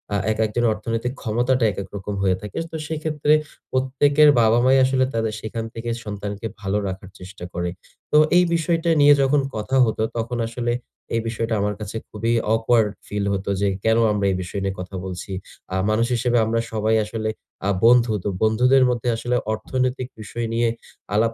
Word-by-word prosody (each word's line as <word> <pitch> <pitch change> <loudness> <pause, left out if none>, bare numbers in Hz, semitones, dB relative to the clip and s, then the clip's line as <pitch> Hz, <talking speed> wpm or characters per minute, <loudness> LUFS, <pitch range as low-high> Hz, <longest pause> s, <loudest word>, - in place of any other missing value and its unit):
আ - - +3 0.2
একেকজনের 110 +2 +1
অর্থনৈতিক 115 +3 -3
ক্ষমতাটা 120 +2 +1
একেক 100 0 -6
রকম 100 +1 -5
হয়ে 95 -1 +3
থাকে। 105 -2 -8
তো - - -6
সেক্ষেত্রে 155 -1 0 0.4
প্রত্যেকের 140 +3 +4
বাবা-মাই 120 +4 +4
আসলে 130 0 +2
তাদের 110 -1 -1
সেখান 115 +1 -4
থেকে 115 +1 -5
সন্তানকে 105 +1 -5
ভালো 95 0 -1
রাখার 95 0 -6
চেষ্টা 90 0 -10
করে। 90 0 -2 0.4
তো - - +5 0.2
এই 180 - +6
বিষয়টা 165 +1 0
নিয়ে 145 0 +8
যখন 140 +1 +3
কথা 110 +5 -1
হতো, 110 -1 -1
তখন 115 +1 -2
আসলে 120 +1 -2 0.4
এই 115 - +1
বিষয়টা 115 0 -2
আমার 105 0 -1
কাছে 105 0 -6
খুবই 115 +2 -1 0.2
awkward 115 -1 +3 0.2
ফিল 105 0 -2
হতো 100 0 -3
যে, 100 - +3 0.2
কেন 110 0 +3
আমরা 105 -1 0
এই - - 0
বিষয় 90 +2 -5
নিয়ে 95 0 -2
কথা 95 +2 -8
বলছি। 95 +2 -6 0.4
আ - - 0
মানুষ 110 +2 +2
হিসেবে 120 +1 +1
আমরা 115 +1 0
সবাই 110 0 +1
আসলে 110 +1 -3 0.4
আ - - +2 0.2
বন্ধু। 120 -1 +5
তো - - -1
বন্ধুদের 125 +5 +4
মধ্যে 120 0 -1
আসলে 120 +2 -1 0.2
অর্থনৈতিক 125 +3 -2
বিষয় 115 +2 -4
নিয়ে 115 0 +2 0.4
আলাপ 115 +2 +2
115 Hz, 175 wpm, -22 LUFS, 105-125 Hz, 0.4 s, নিয়ে